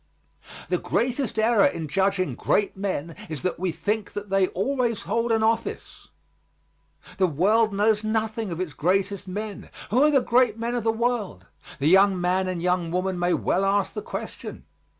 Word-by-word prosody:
The -, -, +1 dB
greatest 250 Hz, 0 st, -1 dB
error 220 Hz, -1 st, +4 dB
in 160 Hz, -2 st, -4 dB
judging 190 Hz, +3 st, 0 dB
great 205 Hz, -, 0 dB
men 185 Hz, -5 st, -3 dB
is 155 Hz, 0 st, -5 dB
that 185 Hz, -2 st, -2 dB
we 185 Hz, -1 st, 0 dB
think 210 Hz, +5 st, -3 dB
that 205 Hz, -1 st, -6 dB
they 195 Hz, -1 st, +3 dB
always 235 Hz, +3 st, -1 dB
hold 230 Hz, +5 st, -1 dB
an 225 Hz, -1 st, +2 dB
office. 225 Hz, +1 st, -2 dB, 1.1 s
The 190 Hz, -2 st, +3 dB
world 210 Hz, +8 st, +2 dB
knows 210 Hz, +2 st, +2 dB
nothing 220 Hz, -1 st, -2 dB
of 165 Hz, -, -4 dB
its 180 Hz, -6 st, -3 dB
greatest 195 Hz, +5 st, 0 dB
men. 205 Hz, +2 st, -6 dB, 0.2 s
Who 245 Hz, +5 st, +3 dB
are 300 Hz, -, +6 dB
the 280 Hz, -3 st, +4 dB
great 240 Hz, -3 st, +3 dB
men 230 Hz, +1 st, -2 dB
of 240 Hz, -2 st, -1 dB
the 225 Hz, -, +2 dB
world? 225 Hz, -, -2 dB, 0.3 s
The 140 Hz, -, 0 dB
young 190 Hz, +2 st, +5 dB
man 185 Hz, +1 st, +1 dB
and 180 Hz, -2 st, -3 dB
young 180 Hz, -2 st, +1 dB
woman 185 Hz, +1 st, -1 dB
may 175 Hz, 0 st, +2 dB
well 190 Hz, -, 0 dB
ask 195 Hz, 0 st, +1 dB
the 425 Hz, -, -4 dB
question. 485 Hz, +4 st, -7 dB
200 Hz, 175 wpm, -25 LUFS, 185-225 Hz, 1.1 s, are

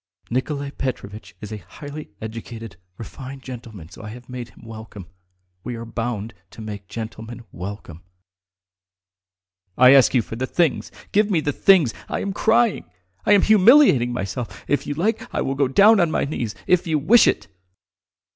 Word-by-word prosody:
Nikolay 140 Hz, +3 st, -2 dB
Petrovitch 110 Hz, -7 st, -6 dB
is 105 Hz, -1 st, -8 dB
a 110 Hz, -, -4 dB
highly 145 Hz, +7 st, -10 dB
educated, 115 Hz, 0 st, -8 dB, 0.2 s
refined 135 Hz, +3 st, -9 dB
gentleman, 115 Hz, -9 st, -9 dB
so 90 Hz, -, -12 dB
I've 115 Hz, +3 st, -10 dB
made 125 Hz, -2 st, -7 dB
him -, -, -19 dB
welcome. 110 Hz, -4 st, -10 dB, 0.6 s
We 125 Hz, -, -5 dB
are 115 Hz, 0 st, -7 dB
bound 115 Hz, -1 st, -4 dB, 0.2 s
to -, -, -12 dB
make 105 Hz, -2 st, -7 dB
gentlemen 115 Hz, +2 st, -7 dB
welcome." 90 Hz, -3 st, -8 dB, 1.8 s
"I 125 Hz, +1 st, +8 dB
ask 135 Hz, -1 st, +5 dB
you 120 Hz, -, +3 dB
for 115 Hz, -, -8 dB
the 130 Hz, +3 st, -3 dB
things! 170 Hz, -1 st, 0 dB, 0.2 s
Give 210 Hz, +1 st, +3 dB
me 180 Hz, -5 st, +2 dB
the 145 Hz, -1 st, -1 dB
things! 170 Hz, -11 st, +4 dB, 0.2 s
I -, -, -2 dB
am 200 Hz, -, -3 dB
crying.... 225 Hz, +2 st, +2 dB, 0.4 s
I 210 Hz, -, +6 dB
am 200 Hz, -, +5 dB
humiliating 215 Hz, -, +6 dB
myself.... 120 Hz, +1 st, -5 dB
If 145 Hz, -1 st, 0 dB
you 145 Hz, -, -3 dB
like 210 Hz, +8 st, -1 dB
I -, -, 0 dB
will 135 Hz, -, -1 dB
go 135 Hz, 0 st, +1 dB
down 200 Hz, -, +6 dB
on 170 Hz, -2 st, +3 dB
my -, -, 0 dB
knees! 120 Hz, -7 st, -4 dB
If 180 Hz, -1 st, +2 dB
you 160 Hz, -2 st, +1 dB
wish 195 Hz, +12 st, +5 dB
it!" -, -, 0 dB
125 Hz, 165 wpm, -22 LUFS, 110-155 Hz, 1.8 s, I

